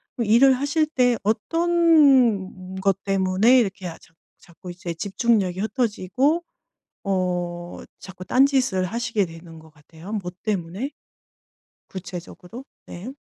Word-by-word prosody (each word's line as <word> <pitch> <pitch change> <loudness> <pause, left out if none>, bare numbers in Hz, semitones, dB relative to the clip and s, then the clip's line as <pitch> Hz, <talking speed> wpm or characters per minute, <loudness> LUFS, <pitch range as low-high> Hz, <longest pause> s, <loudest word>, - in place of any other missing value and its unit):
그럼 230 -4 -2
일을 255 +5 +6
하실 285 +4 0
때 250 -5 +2
어떤 260 - +2
것 195 0 +1
때문에 195 +5 +3
이렇게 195 -5 -2
아 165 - -8
자 - - -22 0.3
자꾸 175 +1 -13
이제 175 -1 -6
집중력이 195 0 0
흩어지고 250 - 0 0.6
어 175 -2 -2 0.2
자꾸 185 -1 -10
딴 260 +7 +4
짓을 255 -10 0
하시게 225 -1 -1
되는 165 0 -12
것 160 - -17
같아요? 160 +4 -14
뭐 185 -4 -4
때문에? 200 - -3 1.0
구체적으로. 185 +5 -9 0.2
네. 185 +8 -8
195 Hz, 250 characters per minute, -23 LUFS, 180-250 Hz, 1.0 s, 일을